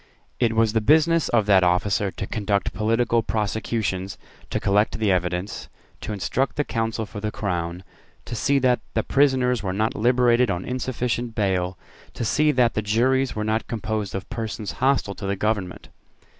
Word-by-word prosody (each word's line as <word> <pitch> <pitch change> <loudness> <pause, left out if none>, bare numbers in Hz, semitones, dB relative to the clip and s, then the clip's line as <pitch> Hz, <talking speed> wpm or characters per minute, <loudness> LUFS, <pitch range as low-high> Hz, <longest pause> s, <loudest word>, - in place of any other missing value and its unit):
It 115 -2 +2
was 110 -1 +3
the 110 - +2
business 160 +6 +3
of 110 -3 +2
that 95 -2 +5
officer 95 +3 +1
to 100 - -5
conduct 100 -2 -1
political 115 +2 +1
prosecutions, 105 -3 -2 0.3
to - - -1
collect 105 +3 +2
the 110 -3 +1
evidence, 90 +2 -2 0.3
to - - -6
instruct 110 +6 -1
the 145 - +1
counsel 115 -3 -2
for 105 - -8
the 105 +1 -3
Crown, 90 -3 -3 0.4
to - - -7
see 140 +5 +1
that 125 -2 +3 0.2
the - - +1
prisoners 130 -4 +2
were 95 -2 -2
not 110 +3 0
liberated 120 +1 +3
on 90 -1 -2
insufficient 125 -2 -2
bail, 95 -3 0 0.4
to 120 - -3
see 150 +7 +3
that 125 -4 +2
the 110 - -1
juries 125 +5 +1
were 105 - -2
not 110 +1 -1
composed 110 -3 -3
of 95 - -5
persons 110 -3 -4
hostile 130 -6 +2
to 100 - -6
the 100 - 0
government. 100 -3 -2
110 Hz, 170 wpm, -23 LUFS, 100-120 Hz, 0.4 s, that